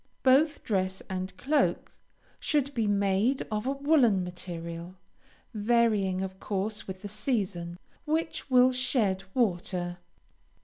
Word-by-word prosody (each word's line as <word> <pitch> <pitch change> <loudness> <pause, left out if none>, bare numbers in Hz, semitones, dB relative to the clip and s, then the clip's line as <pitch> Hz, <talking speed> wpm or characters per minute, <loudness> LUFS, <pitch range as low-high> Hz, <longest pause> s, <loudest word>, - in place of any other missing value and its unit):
Both 285 +4 +4
dress 190 -2 -1
and 185 0 -4
cloak 290 +9 +1 0.5
should 285 -2 0
be 225 -4 0
made 200 +5 +2
of 215 +3 -2
a - - +2
woolen 275 -9 +3
material, 175 0 -6 0.6
(varying 210 -4 +2
of 190 0 -6
course 210 +2 -3
with 190 +1 -7
the - - -4
season,) 200 -6 -2 0.3
which 315 -1 -2
will 255 0 +6
shed 225 -7 0
water. 180 -6 0
205 Hz, 120 wpm, -28 LUFS, 185-255 Hz, 0.6 s, will